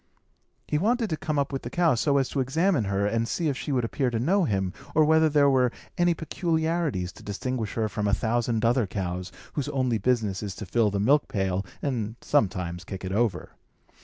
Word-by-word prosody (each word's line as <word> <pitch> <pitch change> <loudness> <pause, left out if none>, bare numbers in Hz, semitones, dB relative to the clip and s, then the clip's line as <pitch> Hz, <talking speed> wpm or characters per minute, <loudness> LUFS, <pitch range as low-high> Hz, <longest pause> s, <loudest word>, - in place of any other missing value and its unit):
He 150 - 0
wanted 225 +2 +1
to - - +1
come 155 -1 -3
up 140 0 0
with 135 - -2
the 120 - -6
cow, 170 +3 +3
so 140 +4 +2
as 135 -2 +2
to 140 - -2
examine 150 - +1
her, 100 0 0
and 115 +2 0
see 165 +4 0
if 140 - -1
she 145 - -4
would 125 -3 +1
appear 130 +2 0
to 120 - -2
know 175 - +2
him, 95 -6 -1 0.2
or 155 0 +6
whether 160 +1 +4
there 145 -1 +4
were 130 -3 +3 0.2
any 175 -1 +2
peculiarities 160 - -1
to - - -15
distinguish 110 +1 -3
her 110 -1 +1
from 105 0 -2
a 100 - +1
thousand 115 0 0
other 120 -2 +2
cows, 90 -1 -4 0.2
whose 145 - -2
only 130 -4 0
business 110 -6 0
is 100 -3 -5
to 105 - -7
fill 110 +3 +2
the 100 0 -2
milk 140 +9 +3
pail, 95 -1 -1 0.2
and 115 -6 -2
sometimes 90 -9 0
kick 95 +1 -7
it 95 - -4
over. 105 -3 0
120 Hz, 215 wpm, -26 LUFS, 100-150 Hz, 0.2 s, or